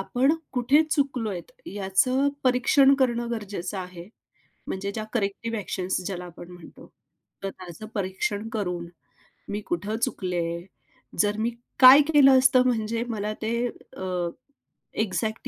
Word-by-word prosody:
आपण 255 +9 +2 0.2
कुठे 265 +4 +4
चुकलोयत 245 - -1 0.2
याचं 205 +8 +1 0.2
परीक्षण 265 +2 +5
करणं 240 -2 +1
गरजेचं 200 -4 -4
आहे, 180 -1 -8 0.6
म्हणजे 200 +1 -3
ज्या 215 +2 -4
करेक्टिव्ह 230 +1 -2
ॲक्शन्स 190 -3 -2
ज्याला 180 -2 -4
आपण 175 0 -11
म्हणतो. 175 -2 -14 0.5
तर 195 - -1
त्याचं 185 +2 -10
परीक्षण 200 +2 -2
करून 180 -5 -3 0.6
"मी 205 +1 -3
कुठं 205 +6 -2
चुकले?" 175 -6 -2 0.6
जर 210 0 +2
मी 225 +2 +1 0.3
काय 260 +2 +10
केलं 270 -2 +7
असतं 255 -1 +5
म्हणजे 230 -1 0
मला 215 -2 -2
ते 235 +2 -1 0.3
अ, 180 -2 -2 0.7
एक्झॅक्ट 220 +1 -2
210 Hz, 125 wpm, -25 LUFS, 185-245 Hz, 0.7 s, काय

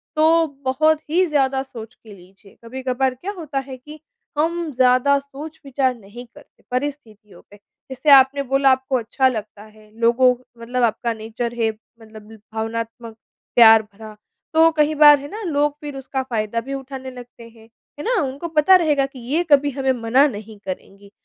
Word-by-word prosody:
तो 320 +1 +3 0.2
बहुत 310 +4 +2
ही 355 +4 +2
ज़्यादा 270 -4 0
सोच 230 -3 -11
के 220 -2 -16
लीजिए। 195 +2 -19
कभी-कभार 260 +1 -2
क्या 360 +11 -6
होता 305 -5 -4
है 260 -1 -8
कि 300 +4 -13 0.4
हम 335 +1 -1
ज़्यादा 255 +2 +3
सोच-विचार 275 -2 -4
नहीं 230 +3 -12
करते - - -19
परिस्थितियों 250 -6 -6
पे। 205 - -16 0.3
जैसे 265 +4 -2
आपने 275 +1 +6
बोला 270 +1 +3
आपको 260 0 0
अच्छा 250 +3 0
लगता 215 -4 -5
है 215 0 -19
लोगों 240 +2 +4 0.3
मतलब 245 +2 -2
आपका 235 +1 0
नेचर 225 +2 -5
है, 225 - +2 0.3
मतलब 220 -1 -14 0.2
भावनात्मक 230 +1 -5 0.4
प्यार 225 -2 +8
भरा। 215 +1 -13 0.4
तो 325 +1 +6
कहीं 305 -1 +1
बार 295 -1 +8
है 285 - -8
ना 430 +2 -7
लोग 295 -4 0
फ़िर 290 -2 -7
उसका 265 0 -4
फ़ायदा 230 -3 -2
भी 270 +3 -7
उठाने 265 -1 -7
लगते 245 -1 -13
हैं। 225 -1 -20 0.3
है - - -5
ना? 470 -4 +1
उनको 275 +5 -5
पता 320 +3 +4
रहेगा 300 -6 +2
कि 270 -1 -11
ये 280 +9 -1
कभी 285 0 +5
हमें 265 0 -1
मना 255 +6 +4
नहीं 215 -3 -9
करेंगी। 195 +1 -9
260 Hz, 170 wpm, -20 LUFS, 225-290 Hz, 0.4 s, प्यार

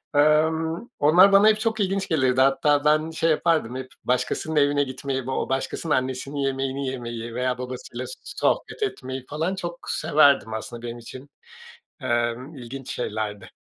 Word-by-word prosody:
Emm, 160 +6 +2
onlar 175 +7 +6
bana 200 +2 +7
hep 215 0 +4
çok 225 0 -1
ilginç 195 -1 0
gelirdi. 130 -5 +2
Hatta 145 +2 +3
ben 155 +2 +3
şey 165 0 0
yapardım, 155 -6 +1
hep 130 0 -5 0.2
başkasının 125 +5 -1
evine 145 -1 +3
gitmeyi, 130 0 -4
o 130 +2 -2
başkasının 135 +4 -1
annesinin 130 +2 -3
yemeğini 135 0 -1
yemeyi 120 -3 -5
veya 125 0 0
babasıyla 125 0 -6
so - - -7
sohbet - - -1
etmeyi 130 - -4
falan 160 +6 -1
çok 175 -2 -5
severdim 140 -6 +3
aslında 115 +2 -6
benim 120 0 -6
için, 130 +4 -11 0.7
emm, 120 +5 -1
ilginç 130 0 -8
şeylerdi. 105 -3 -4
135 Hz, 150 wpm, -24 LUFS, 125-160 Hz, 0.7 s, bana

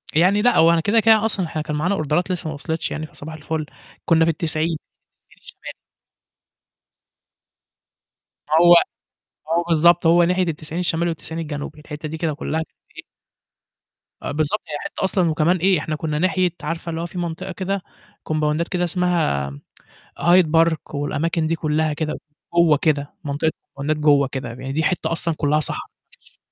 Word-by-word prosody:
يعني 190 +5 +4
لأ، 245 - +3
هو 165 +1 +6
أنا 165 -1 +2
كده، 215 +6 +3
كده 220 0 +5
أصلًا 195 -5 0
إحنا 155 -1 -4
كان 150 -1 -4
معانا 180 +7 0
أوردرات 165 +4 0
لسه 170 -3 -3
ما - - -4
وصلِتش 160 +2 -3
يعني 155 - -4
فصباح 155 +2 -10
الفُل، 155 0 -4 0.4
كنّا 165 -2 +4
في 165 - +3
ال90، 155 0 -1 0.5
ال90 - - -27
الشمالي. - - -10 2.8
هو 175 +2 +7 0.8
هو 170 +1 +2
بالضبط 170 +1 +4
هو 170 +1 +6
ناحية 180 +2 +2
ال90 160 0 -4
الشمالي 170 -1 +1
وال90 165 0 -5
الجنوبي 150 0 -6
الحتّة 150 0 -7
دي 160 - -5
كده 155 -2 -1
كلّها 155 +2 -3
كانت - - -26 0.2
فإيه - - -10 1.2
آه، - - -3
بالضبط 155 +7 -1
هي 150 -1 -4
حتّة - - -5
أصلًا 185 -3 +2
وكمان 165 +4 +2
إيه 185 -1 +3
إحنا 155 0 -3
كنّا 150 -1 -2
ناحية 185 0 +2
عارفة 165 +2 -4
اللي 165 0 -3
هو - - -3
في 180 - -9
منطقة 175 +2 -4
كده 190 +1 -3 0.4
كومباوندات 155 +2 0
كده 180 -1 -1
اسمها 170 - 0
م 70 +1 -11 0.6
Hide 175 +1 +5
park 160 -1 +1
والأماكن 155 +3 -1
دي 165 - 0
كلّها 155 0 0
كده 155 0 -2 0.4
جوّا 170 -4 +5
كده 145 -2 0
منطقة 145 +2 -1 0.2
الكمبوندات 145 +3 -3
جوّه 145 -2 +4
كده 130 -3 -5
ب 125 - -12
يعني 135 +1 -5
دي 160 +2 0
حتّة 180 0 0
أصلًا 165 0 0
كلّها 150 +1 +2
صحرا، - - -3
ما - - -64 0.2
فيش - - -25
160 Hz, 175 wpm, -21 LUFS, 150-175 Hz, 2.8 s, هو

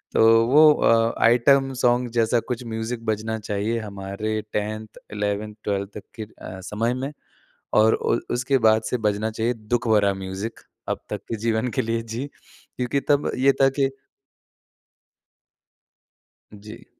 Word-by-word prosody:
तो - - +4 0.3
वो 150 +3 +7
अ, 115 -3 +3
item 135 +3 +4
song 125 0 +3
जैसा 115 +1 +3
कुछ 125 -1 -3
म्यूज़िक 115 +1 -4
बजना 110 +1 -1
चाहिए 105 +3 -2
हमारे 105 +1 -4
10th 110 +1 -4
11th 105 +1 -2
12th 100 -1 -1
तक 105 - -7 0.2
के - - -2
अ, 95 -3 -10
समय 115 +6 -1
में, 135 +3 -4 0.6
और 110 +1 +5
ओल 115 - 0
उसके 130 +2 +1
बाद 110 0 +3
से 125 - 0
बजना 105 +2 -1
चाहिए 115 +2 -1 0.2
दुःख 120 -1 0
भरा 100 -2 +3
म्यूज़िक 95 +4 -6 0.3
अब - - -2
तक - - -3
के 115 - -2
जीवन 115 +2 +1
के - - +4
लिए 115 0 -1
जी। 115 +4 -5 0.5
क्योंकि 125 +2 -1
तब 145 0 +3
ये 140 - +7
था 135 - +7
कि 135 0 +3 2.7
जी। 105 +1 -12
110 Hz, 150 wpm, -23 LUFS, 105-120 Hz, 2.7 s, वो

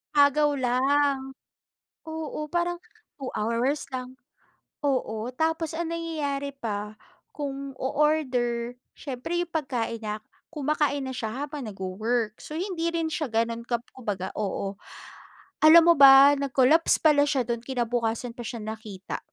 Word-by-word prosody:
Agaw 285 0 +4
lang. 270 +2 +1 0.8
Oo, 315 -1 -5
parang 350 0 0 0.4
2 265 - -4
hours 235 +7 0
lang 255 0 -5 0.7
oo 235 -5 -1
tapos 320 +1 0
ang 335 0 -2
nangyayari 295 -4 -3
pa 210 -4 -4 0.4
kung 275 -2 -5
o-order, 255 -5 0 0.2
siyempre 275 +4 -5
'yong 350 -1 -3
pagkain 245 -7 -2
na 210 0 -4 0.3
kumakain 295 -2 0
na - - -4
siya 240 +4 -3
habang 285 -5 -7
nag-wo-work, 215 +3 -2
so 305 - -7
hindi 345 -2 -2
rin 330 -1 -1
siya 305 -3 -2
gano'n 230 +1 0
kap 235 -1 -1
kumbaga 205 -7 -4
oo. 195 -1 -3 0.9
Alam 325 +2 +9
mo - - -6
ba 275 +1 +10
nag-collapse 280 +4 +4
pala 295 -2 +5
siya 270 -4 +1
do'n 235 -1 -1
kinabukasan 240 -2 -1
pa - - -20
siya 235 -2 -5
nakita. 215 -3 -6
265 Hz, 130 wpm, -26 LUFS, 230-300 Hz, 0.9 s, ba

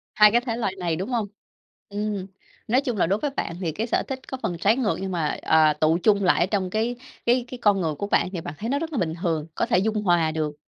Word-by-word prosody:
2 210 -1 +7
cái 240 - +3
thể 240 -2 -3
loại 200 -5 -2
này, 170 -3 -1
đúng 190 +8 -4
hông? 230 -4 -1 0.6
Ừm, 205 -2 -3 0.4
nói 250 +5 +3
chung 245 -5 -2
là 175 - +2
đối 200 +3 +1
với 290 +2 -1
bạn 170 -10 -3
thì 165 -3 -1
cái 220 +9 -3
sở - - +1
thích 265 -1 -4
có 265 - -5
phần 175 - -1
trái 205 +5 +3
ngược 235 -6 +1
nhưng 190 - -3
mà, 165 -4 -1
ờ, 155 -1 +4
tựu 155 +2 +2
chung 205 -2 +4
lại 180 - +4
ở 175 - +4
trong 190 -2 -1
cái 225 +5 -1 0.3
cái 245 +1 +3
cái 250 - -7
con 205 -4 +3
người 155 -3 -1
của 200 - -4
bạn 185 - +2
thì 175 - -4
bạn 145 - -6
thấy 225 - -4
nó 280 +2 +1
rất 330 0 -4
là 290 - -3
bình 160 -7 0
thường, 160 -4 -1
có - - +1
thể 235 - +2
dung 215 +1 0
hòa 170 -4 +3
được. 155 -2 -2
200 Hz, 280 wpm, -24 LUFS, 170-230 Hz, 0.6 s, 2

